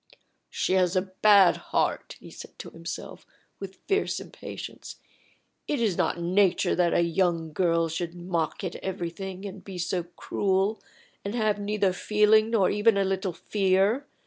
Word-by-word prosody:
"She - - -1
has 185 -1 +2
a 185 - +2 0.2
bad 200 -4 +6
heart," - - -2
he - - -13
said - - -12
to - - -9
himself, - - -7 0.4
with 195 -1 -7
fierce 400 +1 0
impatience. - - -9 0.7
"It 290 - -1
is 215 -6 +1
not 175 - 0
nature 185 +2 +2
that 175 -1 +2
a 170 - +4
young 170 -2 0
girl 165 -1 +2
should 170 +1 -4
mock 175 -2 -3
at 180 -2 -4
everything, 190 +1 -5
and 195 -1 -8
be 190 -2 -8
so 180 +1 -1
cruel, 195 +2 0 0.4
and 200 +3 -4
have 215 -3 +1
neither 205 -2 0
feeling 215 +3 +3
nor 215 -5 +2
even 210 +1 +3
a 200 - +3
little 190 -1 -1
fear. 200 - +1
190 Hz, 155 wpm, -27 LUFS, 175-205 Hz, 0.7 s, bad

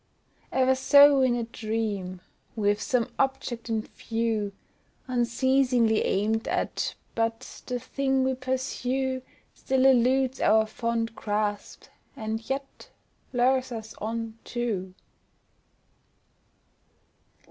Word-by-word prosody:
E'en 260 0 +3
so 280 +1 +7
in 255 -2 +3
a 240 - -1
dream, 215 -5 -3 0.3
we've 205 -1 +1
some 250 -5 +1
object 255 -3 -1
in 220 -1 0
view 225 -3 -2 0.6
Unceasingly 245 -1 +2
aimed 220 +3 0
at, - - -1 0.2
but 225 +2 -3
the 250 - -1
thing 265 +1 0
we 260 0 +1
pursue 260 0 -2 0.3
Still 265 0 0
eludes 260 +1 +3
our 220 0 +4
fond 230 +1 -2
grasp, 205 -1 -2 0.3
and 220 +1 -4
yet 275 - -5 0.4
lures 255 +1 +2
us 220 -2 -6
on 225 +1 -4
too. 205 -7 -3
235 Hz, 100 wpm, -27 LUFS, 220-260 Hz, 0.6 s, so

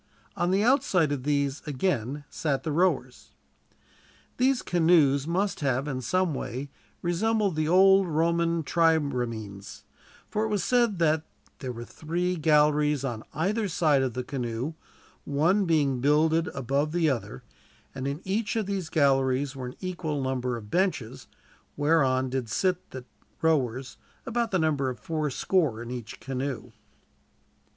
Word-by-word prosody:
On 175 - 0
the 195 +3 +2
outside 230 - +3
of 145 -3 -2
these, 140 -1 0
again, 145 - -1
sat 140 -4 -2
the 160 - -2
rowers. 180 +5 0 1.0
These 260 0 +2
canoes 160 -5 +3
must 190 +4 0
have 135 -1 0
in 130 -3 -3
some 185 +6 0
way 135 +1 -5 0.3
resembled 200 +2 +1
the 155 0 0
old 190 +2 +5
Roman 170 +1 +1
triremes, 125 - -1 0.4
for 215 +1 -1
it - - -2
is 195 - -1
said 240 -5 +2
that 160 -2 +2 0.4
"there 130 -3 -4
were 120 0 -7
three 175 +6 -2
galleries 150 -2 +3
on 120 -4 -3
either 205 +7 0
side 155 -5 +2
of 130 -3 -2
the 125 - -2
canoe, 125 +2 -3 0.5
one 170 +8 +2
being 145 -6 +2
builded 155 +4 +3
above 140 +4 -1
the 170 -2 +2
other; 115 - -3 0.5
and 135 0 -4
in 140 +4 -3
each 210 +3 -1
of 220 -2 0
these 190 -4 -3
galleries 135 -2 +2
were 130 -2 -5
an 125 - -8
equal 175 -5 -3
number 130 -2 -1
of 105 -2 -11
benches, 180 - -1 0.5
whereon 135 -4 +2
did 130 -4 -2
sit 185 - 0
the 130 -1 -8 0.4
rowers, 130 -5 0 0.3
about 235 0 -1
the 190 - +1
number 150 -5 +1
of 125 -3 -6
fourscore 155 - 0
in 120 +1 -7
each 120 -3 -7
canoe." 135 0 -4
150 Hz, 145 wpm, -27 LUFS, 130-175 Hz, 1.0 s, old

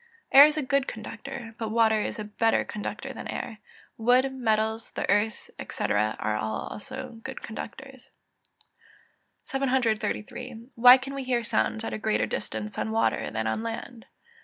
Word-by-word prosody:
_ - - -29 0.3
Air 280 +2 +11
is 305 0 -2
a 305 - 0
good 275 0 +1
conductor, 230 +2 -7
but 225 -2 -2
water 220 -1 +3
is - - -3
a 215 - -4
better 220 +2 +1
conductor 210 - -5
than - - -7
air; 220 - -5 0.4
wood, 250 +4 +4
metals, 220 -3 0
the - - -2
earth, 205 +1 0 0.2
&c., - - -4
are 105 +1 +1
also 205 - -5
good 265 - -7
conductors. 265 +4 -8 1.4
733. 245 -2 -1
_Why 250 +2 +9
can 270 +1 -6
we 275 -1 -4
hear 245 -2 0
sounds 225 0 0
at - - -4
a - - -3
greater 215 0 +1
distance 210 0 -4
on - - -1
water 225 +1 +1
than 110 0 -2
on 110 - -1
land? 230 +1 -6
225 Hz, 160 wpm, -27 LUFS, 215-260 Hz, 1.4 s, Air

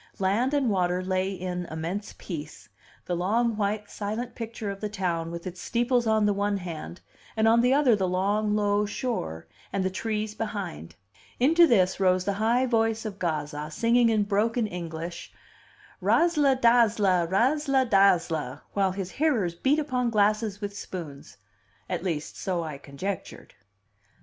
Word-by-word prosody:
Land 220 +9 +1
and 265 -6 +2
water 180 -1 +1
lay 185 +1 0
in 180 -2 -4
immense 170 +6 -5
peace; 150 - -8 0.4
the 180 - -1
long, 220 +6 +1
white, 210 0 -1
silent 220 +4 -4
picture 225 -3 -5
of 195 - -8
the 210 - -2
town 175 -5 -2
with 170 0 -7
its 180 -1 -7
steeples 240 0 +1
on 220 -1 +3
the 205 - +3
one 200 0 0
hand, 175 -1 -7 0.4
and 220 0 +3
on 230 +1 +5
the 250 +1 +3
other 275 -6 +4
the 190 -2 0
long, 205 +3 +1
low 205 0 +1
shore, 80 - -3 0.3
and 195 -1 -1
the 190 - 0
trees 215 +2 -2
behind. 200 - -5 0.4
Into 330 +7 +6
this 190 -8 +3
rose 185 -1 +2
the 200 - 0
high 240 +4 +3
voice 225 -2 +1
of 205 -2 -6
Gazza, 150 -3 -3
singing 235 +7 +3
in 215 -2 +2
broken 215 +3 +1
English, 170 -3 -6 0.7
"Razzla 295 -6 +3
dazzla, 215 -7 +4
razzla 265 - +2
dazzla," 170 - +2
while 195 -2 +1
his 190 -1 -5
hearers 250 - +1
beat 265 - +1
upon 255 -5 0
glasses 210 -1 +1
with 205 -1 -5
spoons 160 - -8 0.5
at 180 -2 -3
least 160 -5 -3
so 180 -3 -2
I 150 -3 -6
conjectured. 160 +9 -6
205 Hz, 155 wpm, -27 LUFS, 180-230 Hz, 0.7 s, Into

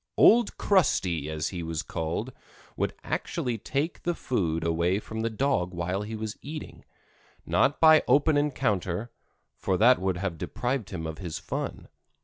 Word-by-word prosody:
"Old 235 -1 +6
Crusty," 90 - +2
as 80 0 -2
he 90 -3 -5
was 80 -1 -3
called, 85 +10 -3 0.4
would - - -1
actually 120 -3 -2
take 150 - -2
the 175 -1 -1
food 85 - -1
away 85 +3 +1
from 110 +1 -5
the 115 - 0
dog 110 -7 0
while 90 +3 -2
he 110 +2 -5
was 110 -1 -5
eating, 150 +2 -8 0.6
not 145 - +2
by 155 -1 +7
open 145 +2 +4
encounter, 115 - 0 0.5
for 95 -2 0
that 125 +5 +6
would 95 -1 0
have 90 -3 -3
deprived 120 -1 -2
him 80 -4 -5
of 80 0 -5
his 85 -4 -4
fun. - - -5
105 Hz, 155 wpm, -27 LUFS, 85-135 Hz, 0.6 s, by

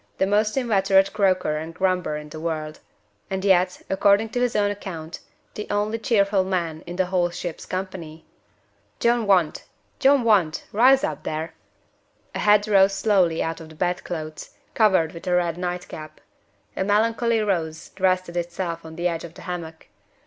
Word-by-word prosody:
The - - +2
most 210 +4 +1
inveterate 195 -5 +3
croaker 185 -7 +1
and 160 +2 -6
grumbler 180 -4 0
in 150 0 -9
the 155 - -8
world 155 -2 -4 0.5
and 190 0 -3
yet, 185 -1 +2
according 200 +3 +3
to 245 - -2
his 245 -1 0
own 205 -1 +2
account, 175 -5 -7 0.3
the 210 - -6
only 210 +2 -1
cheerful 200 -5 +2
man 170 -4 -2
in 175 - -6
the 185 0 +1
whole 180 -1 +1
ship's 175 -1 -6
company. 185 -4 -6 0.7
John 235 -2 +2
Want! 180 -6 +2 0.4
John 275 -1 +4
Want! 195 -9 +2
Rouse 260 +6 +5
up, 300 - -2
there!" 160 +1 -4 0.8
A - - -4
head 210 0 +4
rose 195 -1 +4
slowly 190 -6 +2
out 165 0 -4
of 160 - -11
the 160 - -14
bedclothes, 165 -3 -4 0.2
covered 190 -8 +3
with 170 - -10
a 180 - +2
red 170 -2 +1
night 180 0 -3
cap. 155 0 -10 0.6
A - - 0
melancholy 225 +3 +2
nose 160 -5 -2
rested 185 -2 +1
itself 170 -1 -3
on 160 0 -10
the 175 +1 0
edge 165 -2 -3
of 170 -1 -10
the - - -12
hammock. 165 -3 -6
185 Hz, 170 wpm, -23 LUFS, 165-205 Hz, 0.8 s, Rouse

